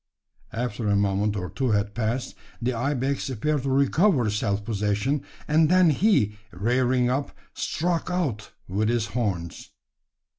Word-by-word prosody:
After 115 -2 -3
a 100 - +3
moment 100 +1 +1
or 90 -2 -4
two 130 -2 -1
had 105 0 0
passed, 120 +3 -2 0.3
the 125 +1 -1
ibex 135 +2 -1
appeared 145 +4 -1
to 135 - -2
recover 140 - +3
self 105 -1 -1
possession; 105 +6 0 0.3
and 155 +1 +4
then 180 -2 +5
he, 130 - +2
rearing 125 +5 +1
up, 135 +3 -2 0.2
struck 170 +2 -1
out 145 - -2 0.2
with 105 +4 0
his 120 -2 +1
horns. 95 -8 -3
120 Hz, 140 wpm, -25 LUFS, 105-140 Hz, 0.3 s, then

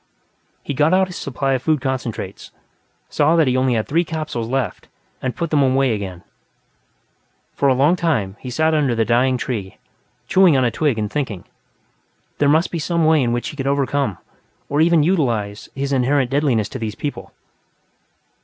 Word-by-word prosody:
He - - -4
got 150 +6 +3
out 190 0 +4
his 180 -1 -10
supply 135 0 -2
of 130 - -1
food 155 +1 +1
concentrates, 130 -3 -4 0.6
saw 150 +3 +2
that 165 -2 +4
he 130 - +1
had 130 - +2
only 130 -3 +2
three 165 +8 +1
capsules 155 -8 -4
left, 125 -5 -3 0.3
and 130 -1 -3
put 170 -2 -3
them 150 -2 +3
away 135 -2 +2
again. 95 -4 -6 1.3
For 140 - +1
a 130 - +3
long 145 +7 +3
time, 140 - -1
he 130 - -7
sat 160 +5 +1
under 140 -6 +1
the 115 -1 +1
dying 125 +3 +2
tree, 105 -7 -4 0.5
chewing 185 -5 +5
on 130 - +2
a 120 - +1
twig 145 -4 0
and 105 -1 -2
thinking. 125 -11 -3 1.0
There 145 - +3
must 160 +4 +2
be 170 - -3
some 170 +1 0
way 160 -1 +4
in 120 -2 +1
which 120 0 -2
he - - -9
could 135 -2 -3
overcome, 140 -6 0 0.5
or 145 +2 +1
even 165 -1 +4
utilize, 120 - -1
his 140 +1 -2
inherent 130 0 +1
deadliness 135 -7 +1
to 130 - -6
these 110 -2 -4
people. 145 - -6
135 Hz, 180 wpm, -20 LUFS, 120-155 Hz, 1.3 s, chewing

